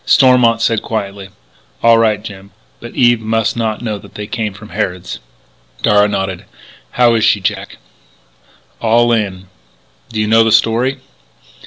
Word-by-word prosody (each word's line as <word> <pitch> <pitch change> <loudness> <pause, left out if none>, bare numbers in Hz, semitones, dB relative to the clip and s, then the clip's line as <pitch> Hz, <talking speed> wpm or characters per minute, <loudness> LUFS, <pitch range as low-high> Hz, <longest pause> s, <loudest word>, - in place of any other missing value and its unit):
Stormont 125 -4 +4
said 115 -2 +1
quietly: 100 -3 -5 0.5
"All 115 0 +5
right, 110 -2 +1
Jim, 100 -2 -10 0.3
but 120 - -11
Eve 120 -2 +3
must 110 0 -1
not 115 0 -3
know 105 -3 -3
that - - -16
they 105 - -6
came 110 -1 -3
from 105 +1 -12
Harrod's." 90 -2 -4 0.6
Darragh 105 0 +4
nodded: 95 -2 -3 0.5
"How 120 -1 +4
is 110 -2 +1
she, 110 -2 +3
Jack?" 100 +2 -4 1.0
"All 120 +1 +2
in." 100 -5 -1 0.6
"Do 110 - -4
you 105 - +1
know 115 +1 +4
the 115 - +1
story?" 120 +4 +1
110 Hz, 150 wpm, -15 LUFS, 105-115 Hz, 1.0 s, All